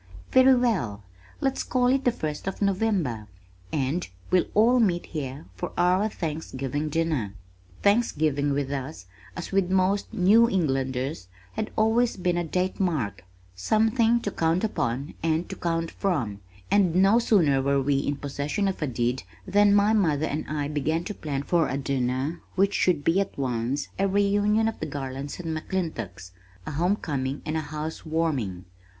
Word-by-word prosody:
"Very 260 0 +7
well, 180 - 0 0.4
let's 270 0 0
call 250 -1 0
it 265 +2 +2
the 245 - +5
first 155 -6 -5
of 195 - -3
November, 190 - 0 0.4
and 150 +4 -1 0.2
we'll 185 -1 +3
all 235 +4 +5
meet 180 -7 +2
here 135 - -6
for 95 - -5
our 185 +4 +3
Thanksgiving 150 - -3
dinner." 150 -11 -1 0.5
Thanksgiving 155 - +2
with 140 -1 -1
us, 135 -6 -5 0.3
as - - -6
with 195 -2 +2
most 190 +2 +1
New 220 +6 +5
Englanders, 135 - -1 0.3
had 215 - -3
always 225 +2 +2
been 180 -1 0
a 175 - 0
date 180 +3 -1
mark, 115 - -1 0.3
something 225 - +2
to 205 - -3
count 165 +3 +1
upon 135 - -2
and 165 +1 0
to - - -5
count 165 -1 -2
from, 130 - -1 0.3
and 185 -5 +3
no 195 +5 +5
sooner 165 - +3
were 140 +1 +2
we 135 +1 +1
in 145 +1 -1
possession 145 +7 -2
of 190 - -3
a 150 - 0
deed, 120 +1 -1 0.2
than 205 +1 +4
my 205 +2 +4
mother 155 -8 +2
and 150 0 -3
I 145 -2 -1
began 155 +3 -1
to 210 - -5
plan 145 -7 -4
for 170 +1 +2
a 135 - -1
dinner 135 +3 -1
which 200 +1 +3
should 165 -6 +2
be 165 +6 +3
at 200 - -2
once 125 +1 -2
a 195 - +3
reunion 205 +2 +2
of 225 - -3
the 155 - -3
Garlands 135 0 -5
and 165 -2 -3
McClintocks, 115 - -4 0.3
a - - -4
homecoming 150 -5 -1
and 155 - -2
a 160 - 0
housewarming. 150 - -3
160 Hz, 160 wpm, -26 LUFS, 140-195 Hz, 0.5 s, Very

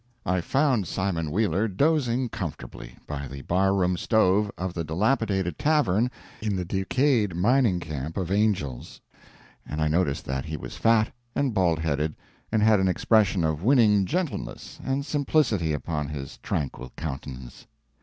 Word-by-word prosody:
I 90 0 +1
found 130 - +1
Simon 85 -5 -1
Wheeler 100 +3 +1
dozing 130 - +1
comfortably 65 - -7
by 70 -2 -5
the 70 +1 -8
bar 95 +2 +2
room 90 -2 +1
stove 105 -1 +3
of 90 -1 -3
the 85 - -3
dilapidated 95 - 0
tavern 140 -7 +2 0.3
in 105 -2 -1
the 90 -1 -2
decayed 105 - +1
mining 110 0 +3
camp 75 -1 -5
of 95 -2 -2
Angel's, 100 - -1 0.6
and 75 - -5
I 80 - +2
noticed 75 -3 0
that 65 -1 -3
he 80 0 -4
was - - -8
fat 115 -1 +3 0.2
and 135 -4 +1
bald 90 -5 +2
headed, 75 -1 -1 0.4
and 110 -1 +2
had 110 -2 +5
an 95 - +2
expression 100 -1 +3
of 80 -1 0
winning 105 -6 +4
gentleness 175 -3 -4
and 135 +1 -1
simplicity 135 - +1
upon 75 0 -2
his 70 -2 -7
tranquil 65 -3 -4
countenance. 65 -4 -7
95 Hz, 150 wpm, -26 LUFS, 80-110 Hz, 0.6 s, had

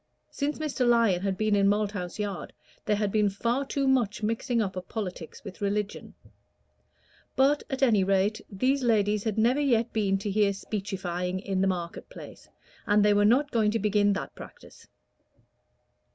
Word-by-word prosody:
Since 290 +1 -2
Mr. 300 -4 -2
Lyon 230 -7 +3
had 195 -1 -1
been 215 0 +1
in 200 -1 +3
Malthouse 200 -3 -1
Yard 205 -3 -4 0.3
there 210 - +2
had 205 -1 -1
been 210 -1 +2
far 235 +7 -1
too 275 -1 -1
much 235 -6 +1
mixing 230 +3 0
up 195 -4 -1
of 185 0 -7
politics 185 -7 -6
with 200 -3 -10
religion; 205 0 -3 1.2
but, 280 +2 +3
at 270 0 -2
any 215 -7 +4
rate, 195 +3 +1
these 255 +8 0
ladies 210 -3 +1
had 220 -1 -1
never 240 +5 +3
yet 240 -5 +1
been 200 -3 +1
to 200 +1 -4
hear 205 0 +2
speechifying 185 -3 -4
in 190 -1 -2
the 195 - +2
market 175 -2 -4
place, - - -12 0.4
and 205 -1 +4
they 210 - +5
were 205 0 +3
not 270 +7 +3
going 220 -3 +2
to 220 - 0
begin 205 -1 +2
that 195 - -5
practice. - - -13
210 Hz, 170 wpm, -27 LUFS, 195-230 Hz, 1.2 s, they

